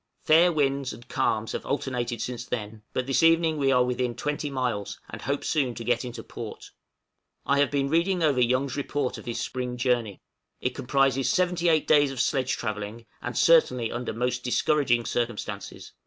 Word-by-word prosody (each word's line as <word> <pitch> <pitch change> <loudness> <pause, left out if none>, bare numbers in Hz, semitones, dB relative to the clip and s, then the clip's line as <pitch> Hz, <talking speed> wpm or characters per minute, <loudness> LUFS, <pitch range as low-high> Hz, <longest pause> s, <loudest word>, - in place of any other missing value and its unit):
Fair 170 +3 +5
winds 140 -3 0
and 120 +1 -13
calms 115 -4 0
have - - -4
alternated 125 -4 -2
since 120 0 -4
then, 110 -2 -5
but 130 - -2
this 135 -1 +1
evening 165 -1 +4
we 135 -2 +2
are 125 -1 +4
within 125 -1 -1
20 150 0 -2
miles, 125 -7 -2
and - - -7
hope 140 +1 -2
soon 135 -6 0
to 115 - -6
get 120 +1 +1
into 125 -1 -7
port. - - -8 0.7
I 140 0 +2
have 145 - +3
been 140 -1 0
reading 170 +4 +1
over 140 -5 +3
Young's 130 +2 +1
report 145 -2 -2
of - - -12
his 120 - -3
spring 125 -1 -3
journey. 120 -5 0 0.4
It - - -2
comprises 135 0 +1
seventy 180 -3 +2
eight 160 -2 +3
days 145 -2 +5
of 135 -2 -6
sledge 130 0 +1
travelling, 110 0 -5 0.2
and 125 - -4
certainly 125 -8 +4
under 120 +1 -3
most 125 +2 -2
discouraging 125 -2 +2
circumstances. 105 -4 -4
130 Hz, 180 wpm, -26 LUFS, 120-145 Hz, 0.7 s, Fair